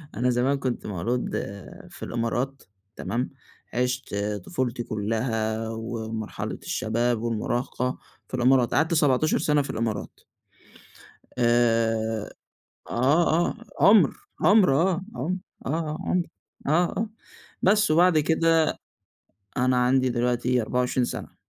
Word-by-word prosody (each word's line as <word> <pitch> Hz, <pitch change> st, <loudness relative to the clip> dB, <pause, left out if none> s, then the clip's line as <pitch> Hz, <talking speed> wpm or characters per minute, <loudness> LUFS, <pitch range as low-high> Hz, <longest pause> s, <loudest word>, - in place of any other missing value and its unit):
أنا 125 Hz, +4 st, +1 dB
زمان 125 Hz, +3 st, +2 dB
كنت 130 Hz, -5 st, -3 dB
مولود 110 Hz, +6 st, -2 dB, 0.6 s
في -, -, -11 dB
الإمارات 120 Hz, +4 st, -2 dB, 0.3 s
تمام، 115 Hz, +7 st, -2 dB, 0.4 s
عِشت 125 Hz, -3 st, -1 dB, 0.3 s
طفولتي 125 Hz, -7 st, -2 dB
كلّها 110 Hz, +1 st, -2 dB
ومرحلة 110 Hz, -1 st, -5 dB
الشباب 115 Hz, +1 st, 0 dB
والمراهقة 120 Hz, +2 st, -2 dB, 0.3 s
في -, -, -24 dB
الإمارات، 125 Hz, 0 st, +3 dB
قعدت 160 Hz, +3 st, +2 dB
17 150 Hz, -1 st, +3 dB
سنة 150 Hz, -1 st, +2 dB
في 140 Hz, -, -6 dB
الإمارات. 110 Hz, -3 st, -3 dB, 1.1 s
آآ، 115 Hz, -2 st, +1 dB, 0.6 s
آه، 140 Hz, +8 st, +3 dB, 0.2 s
آه، 175 Hz, -, +1 dB, 0.3 s
عُمر، 200 Hz, -4 st, +7 dB, 0.3 s
عُمر 205 Hz, -3 st, +6 dB
آه، 190 Hz, -1 st, +1 dB
عُمر 180 Hz, +4 st, -2 dB, 0.3 s
آه، 155 Hz, +1 st, -2 dB
عُمر 180 Hz, -1 st, +1 dB, 0.4 s
آه، -, -, +2 dB, 0.3 s
آه، 220 Hz, +3 st, 0 dB, 0.6 s
بس 210 Hz, -2 st, +4 dB
وبعد 170 Hz, 0 st, +5 dB
كده 160 Hz, +1 st, +3 dB, 0.9 s
أنا 125 Hz, 0 st, +2 dB
عندي 130 Hz, +1 st, +3 dB
دلوقتي 125 Hz, +1 st, +1 dB
24 125 Hz, +2 st, 0 dB
سنة. -, -, -6 dB
125 Hz, 110 wpm, -25 LUFS, 115-150 Hz, 1.1 s, عُمر